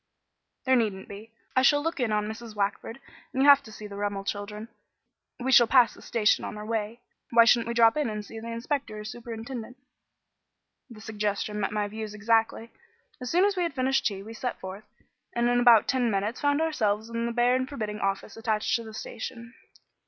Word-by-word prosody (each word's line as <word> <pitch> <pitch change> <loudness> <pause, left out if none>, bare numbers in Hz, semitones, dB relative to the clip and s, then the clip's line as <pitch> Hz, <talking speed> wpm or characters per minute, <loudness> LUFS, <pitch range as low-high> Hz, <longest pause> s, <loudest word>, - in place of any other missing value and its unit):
"There 260 0 +4
needn't 210 -6 -1
be. 210 +3 -10 0.2
I 260 - +5
shall 290 +2 +4
look 330 -2 -2
in 240 -4 0
on 210 0 0
Mrs. 220 0 -8
Wackford 205 +4 -2 0.3
and 265 - +1
you - - +4
have 285 -1 +8
to 220 - -13
see 215 - -10
the 200 -1 -8
Rummel 205 -1 -2
children; 210 +2 -5 0.7
we 260 +1 -1
shall 240 -2 +7
pass 250 -2 +5
the - - -15
station 220 -3 +1
on - - -6
our 210 - -7
way. 225 +1 -3 0.3
Why 230 -1 +6
shouldn't 235 -1 +4
we 235 - -3
drop 230 -1 +5
in 295 -6 0
and 210 -1 -5
see 225 - -9
the 225 - -8
inspector 230 -1 -3
or - - -7
superintendent?" 230 +2 -7 1.1
The 220 -3 -12
suggestion 210 -1 -3
met 195 - -1
my 210 -1 -1
views 215 0 -6
exactly. 225 +2 +1 0.5
As 250 - -4
soon 360 +6 +4
as 405 0 +1
we 365 - -1
had 335 -5 -2
finished 265 +1 +1
tea, 195 -2 -5
we 225 +2 -9
set 245 +2 -4
forth, 190 +2 -8 0.5
and 240 0 +2
in 245 0 +3
about 240 -3 +6
ten 255 -3 +1
minutes 210 +3 -2
found 285 +1 +2
ourselves 220 -8 -1
in 230 0 -2
the - - -2
bare 240 +1 +3
and 255 0 -1
forbidding 215 -7 -4
office 195 +1 -2
attached 220 -1 0
to 230 - -7
the 220 -1 -10
station. 230 +1 -7
225 Hz, 210 wpm, -27 LUFS, 210-245 Hz, 1.1 s, have